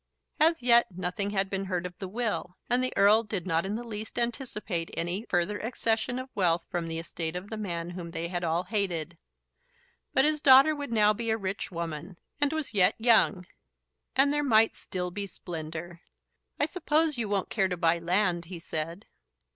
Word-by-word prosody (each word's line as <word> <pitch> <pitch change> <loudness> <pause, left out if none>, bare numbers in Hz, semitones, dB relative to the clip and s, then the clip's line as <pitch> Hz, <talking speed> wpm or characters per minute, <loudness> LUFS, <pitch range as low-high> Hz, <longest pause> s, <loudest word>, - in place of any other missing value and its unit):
As 320 -3 +3
yet 235 -1 +6
nothing 185 +2 -3
had 195 -1 0
been 195 0 -3
heard 180 -2 -2
of 180 0 -6
the 190 - -5
will, 210 -3 -3
and 250 +1 +3
the 255 - 0
Earl 210 +3 +6
did 205 -5 -4
not 165 0 0
in 205 - -2
the 235 - -4
least 220 -1 -7
anticipate 230 -8 -2
any 180 +7 -2
further 180 +4 0
accession 230 +1 -1
of 255 0 -6
wealth 175 -4 +2
from 175 -2 -2
the 165 0 -3
estate 165 0 -3
of 185 +4 -6
the - - -2
man 175 -5 -4
whom 175 -1 -7
they 165 0 -4
had 175 0 -3
all 170 +1 0
hated. 180 -5 -1 0.9
But 265 - +4
his 305 -1 +2
daughter 275 +3 +7
would 285 -4 -5
now 215 -2 +4
be 230 +2 -4
a 220 - +2
rich 195 -1 -4
woman; 170 0 -6 0.2
and 290 -1 +2
was 315 -6 -3
yet 195 0 +4
young, 220 -5 +3 0.7
and 275 +2 +4
there 295 - +1
might 225 -4 +4
still 180 -1 -5
be 200 +2 -4
splendour. 170 -1 -7 0.6
"I - - +3
suppose 310 -4 +1
you 220 -3 -1
won't 200 -2 -1
care 195 -3 +2
to 180 -1 -3
buy 170 0 +2
land," 175 0 +1
he 175 +1 -7
said. 165 +4 -5
195 Hz, 195 wpm, -28 LUFS, 175-230 Hz, 0.9 s, daughter